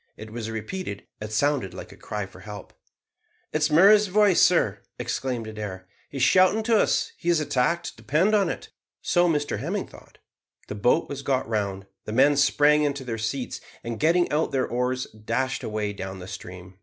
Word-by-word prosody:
It 110 0 -9
was 115 -2 -4
repeated. 110 - -5 0.2
It 105 0 -6
sounded 120 -5 0
like - - -9
a - - -12
cry 105 -2 -5
for 95 - -15
help. 105 -1 -10 0.8
"It 155 - 0
is 150 - +3
Murray's 200 +7 +6
voice, 200 -1 +4
sir," - - +3 0.2
exclaimed 125 -4 -3
Adair; 105 -4 -7 0.2
"he 140 - -7
is 130 - +1
shouting 185 +8 +4
to 225 0 +3
us; - - +1
he 170 - -3
is 170 -2 +4
attacked, 155 +4 0
depend 170 +10 +1
on 205 -2 +3
it." - - -6 0.3
So 175 0 +3
Mr 150 -2 -1
Hemming - - -2
thought. - - -17 0.5
The - - -3
boat 120 +10 +2
was 140 -1 -6
got 135 -2 0
round, 100 -3 -2 0.2
the 105 - -5
men 140 +4 +5
sprang 145 +2 +4
into 140 -2 -1
their 115 -3 -4
seats, 120 +4 -3 0.2
and, 115 -1 -5
getting 170 +3 +3
out 155 +2 +1
their 130 -2 +1
oars, 125 +1 -1
dashed 115 +5 -3
away 105 -1 -2
down 95 -1 -6
the 90 0 -9
stream. 90 0 -10
130 Hz, 190 wpm, -25 LUFS, 110-155 Hz, 0.8 s, Murray's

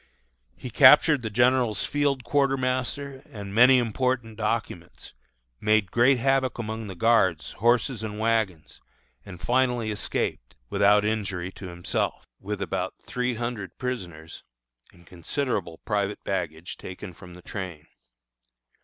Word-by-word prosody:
He 125 - -8
captured 145 +3 +7
the 110 - -3
general's 120 -1 +2
field 140 -3 0
quartermaster 135 +1 -1
and 100 -2 -8
many 125 +4 +7
important 120 -1 -1
documents, 105 -5 -4 0.5
made 105 -3 +2
great 125 +3 +4
havoc 135 0 +1
among 110 -1 -5
the 95 - -7
guards, 95 -5 +2
horses, 120 +1 +1
and 105 -1 -5
wagons, 110 -7 -1 0.5
and 90 -3 -9
finally 120 0 +1
escaped, 105 - -3 0.2
without 105 +1 +4
injury 95 -4 -2
to 95 - -9
himself, 85 0 -3
with 100 0 -4
about 95 -1 -3
three 125 -1 -2
hundred 115 -4 -5
prisoners, 90 -11 -6 0.5
and 85 - -21
considerable 90 - -3
private 105 -1 -1
baggage 85 -3 -4
taken 95 -1 -9
from 90 +1 -13
the 90 - -14
train. 90 -7 -7
110 Hz, 125 wpm, -26 LUFS, 95-125 Hz, 0.5 s, captured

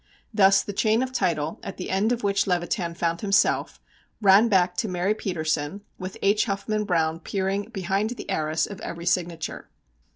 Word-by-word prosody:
Thus 195 -2 +5
the 205 - -6
chain 220 +4 +2
of 260 - -4
title, 165 - -1
at 195 - -7
the 180 - -5
end 200 +4 +2
of 240 -2 -1
which 200 -1 +1
Levitan 175 -1 -1
found 170 0 -1
himself, 200 -1 +2 0.4
ran 205 +2 +6
back 180 -3 +3
to 225 - 0
Mary 185 +2 0
Petersen, 160 -3 -2 0.2
with 185 0 -6
H. 205 +2 +3
Huffman 210 +1 -2
Browne 165 -4 +1
peering 195 +3 -2
behind 195 +1 -1
the 245 - -7
arras 155 +1 0
of 200 - -9
every 170 0 -6
signature. 175 -2 -2
190 Hz, 170 wpm, -25 LUFS, 170-205 Hz, 0.4 s, ran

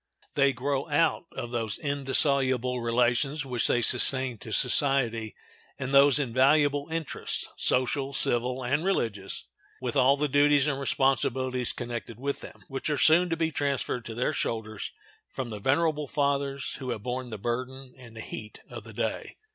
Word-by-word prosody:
They 140 -1 +3
grow 135 +4 -2
out 160 +2 +1
of 120 - -6
those 115 -4 -2
indissoluble 135 -3 +1
relations 125 +5 +1
which 125 -3 0
they 120 - +2
sustain 130 0 +4
to 120 -4 -9
society, 120 -3 +2 0.4
and 130 +2 -4
those 140 0 +6
invaluable 145 +3 +2
interests—social, 140 -3 -1
civil, 125 0 +2
and 145 +6 0
religious—with 115 - -4
all 135 +1 +4
the 150 +1 0
duties 145 0 +4
and 140 -3 -1
responsibilities 130 -2 +1
connected 120 -2 -6
with 140 +2 -3
them, - - -12
which 135 +2 -3
are 150 - 0
soon 170 +5 +5
to 165 - -1
be 160 -1 0
transferred 140 -4 -2
to 115 - -7
their 125 - 0
shoulders 110 -2 -3 0.4
from 125 -3 -5
the 105 - -6
venerable 150 +5 +1
fathers 140 -1 -1
who 130 -2 -6
have 110 -4 -4
borne 125 +1 -4
the 110 - -6
burden 125 +4 -5
and 115 -3 -14
heat 110 -1 -8
of - - -8
the - - -11
day. - - -4
130 Hz, 155 wpm, -27 LUFS, 120-140 Hz, 0.4 s, those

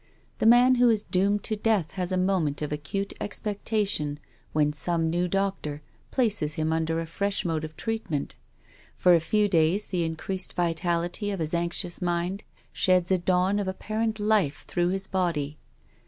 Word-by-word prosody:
The - - +3
man 245 +2 +7
who 245 - +6
is 215 -2 +2
doomed 200 +3 +1
to 220 - 0
death 210 -6 +1
has 185 -1 -3
a 185 - +1
moment 180 -6 0
of 150 - -3
acute 195 +7 -3
expectation 205 -7 -1 0.3
when 150 -1 +2
some 165 +1 0
new 175 +1 +1
doctor 190 -6 -2 0.3
places 205 - 0
him 160 0 0
under 165 0 0
a 165 - -3
fresh 200 +5 -2
mode 160 -2 -1
of 155 0 -7
treatment. 220 -9 -3 0.6
For 180 - +5
a 170 - +6
few 210 +6 +2
days 175 +2 +2
the 180 -3 -1
increased 165 +4 -3
vitality 175 +3 0
of 195 -2 -3
his 160 0 -2
anxious 170 +1 -1
mind 175 +3 -1 0.3
sheds 185 -1 +2
a 185 - +3
dawn 185 +3 +2
of 200 - -2
apparent 215 +3 -2
life 205 -8 +1
through 175 -1 0
his 190 +1 -2
body. 165 -7 -1
180 Hz, 170 wpm, -27 LUFS, 160-200 Hz, 0.6 s, man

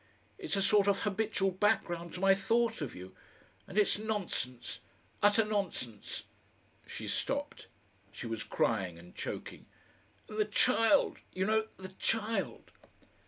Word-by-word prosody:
It's 340 - -1
a 195 - +2
sort 205 0 +4
of 200 -1 +3
habitual 205 -2 +1
background 175 -3 0
to - - -5
my 195 +1 +6
thought 225 +2 +1
of 145 - -4
you. 90 +1 -10 0.5
And 195 - -7
it's 210 -1 +3
nonsense 200 - -3 0.4
utter 205 +2 +5
nonsense!" 190 - -3 0.6
She - - -6
stopped. - - -2 0.4
She - - -7
was 115 -1 -3
crying 90 -4 0
and 90 +1 -14
choking. - - -6 0.6
"And 215 0 -6
the 215 - +4
child, 225 +5 +4
you 185 +1 0
know 220 +1 +2
the 190 0 -7
child!" 225 0 -1
200 Hz, 135 wpm, -32 LUFS, 175-220 Hz, 0.6 s, my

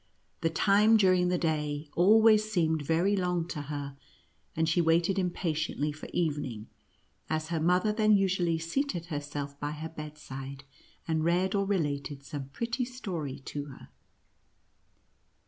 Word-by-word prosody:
The 165 - +2
time, 210 +6 +4
during 185 -3 +4
the 180 0 +1
day, 150 -2 -1
always 215 +3 +5
seemed 160 -5 +1
very 165 +7 +2
long 180 -3 0
to 150 - -4
her, 145 -1 -5 0.6
and 160 0 +1
she 165 +2 +3
waited 170 +4 +2
impatiently 160 -4 -1
for 150 - -9
evening, 145 -10 -2 0.6
as 155 0 -2
her 165 -1 -1
mother 180 +6 +3
then 215 -1 +4
usually 180 -4 +1
seated 170 - -2
herself 145 -1 -5
by 145 +1 -3
her 155 +1 -6
bedside, 140 -3 -8 0.4
and 160 -1 0
read 180 +3 +2
or 200 -1 +1
related 145 -7 -2
some 140 -1 -6
pretty 235 - -2
story 185 - -5
to 145 -1 -4
her. 140 -3 -12
165 Hz, 140 wpm, -29 LUFS, 145-190 Hz, 0.6 s, always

